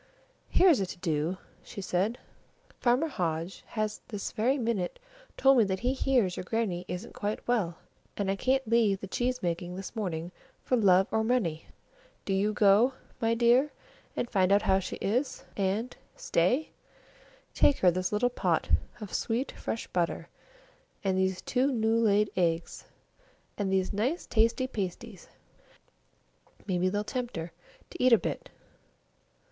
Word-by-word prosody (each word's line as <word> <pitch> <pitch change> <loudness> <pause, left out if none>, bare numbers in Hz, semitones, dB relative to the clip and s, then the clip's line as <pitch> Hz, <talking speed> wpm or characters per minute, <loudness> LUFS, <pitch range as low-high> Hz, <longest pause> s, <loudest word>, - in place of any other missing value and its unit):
"Here's 355 - +5
a 190 - -1
to 185 - -8
do," 165 0 -1 0.2
she - - -10
said. 195 +5 0 0.6
"Farmer 245 +5 +3
Hodge 175 - -3
has 215 -1 -3
this 205 -5 -5
very 245 +5 +1
minute 225 -8 -1 0.4
told 270 -1 +5
me - - +6
that 190 -1 -2
he 250 +2 +1
hears 250 -9 +1
your - - -5
Grannie 185 -4 -2
isn't 180 +6 -6
quite 210 +1 -4
well, 200 -9 0 0.4
and 195 -1 0
I - - 0
can't 265 +4 +1
leave 220 -4 +3
the - - -6
cheese 250 +5 -2
making 175 +1 -2
this 195 +4 -7
morning 175 -5 -3 0.3
for 255 - +1
love 190 -5 +5
or 220 - +1
money! 215 -10 0 0.6
Do 195 - -1
you 200 +2 +2
go, 210 +5 +4 0.3
my 230 0 +2
dear, 240 +5 +4 0.4
and - - -1
find 190 -4 +2
out 200 +1 +4
how 190 - +3
she 185 - -5
is 245 +8 -2
and 205 +5 -1 0.2
stay 245 - +1 0.8
take 285 - +4
her 180 - +5
this 185 +1 -2
little 240 +4 +1
pot - - 0 0.3
of 210 -4 -8
sweet 240 +4 -1
fresh 225 - -4
butter, 175 -2 -2 0.7
and 190 -2 +1
these 190 0 0
two 260 +2 +1
new 225 -2 +2
laid 210 -2 +3
eggs, 170 -2 -1 0.7
and 200 -2 -2
these 190 0 +1
nice 250 - -1
tasty 230 +3 +2
little 260 - -5
pasties. 190 -4 -5 1.4
Maybe 185 -2 +1
they'll 205 +2 -1
tempt 245 -2 -4
her 165 +1 -5 0.4
to - - -4
eat 255 -1 +6
a - - +9
bit. - - -4
210 Hz, 155 wpm, -29 LUFS, 185-240 Hz, 1.4 s, a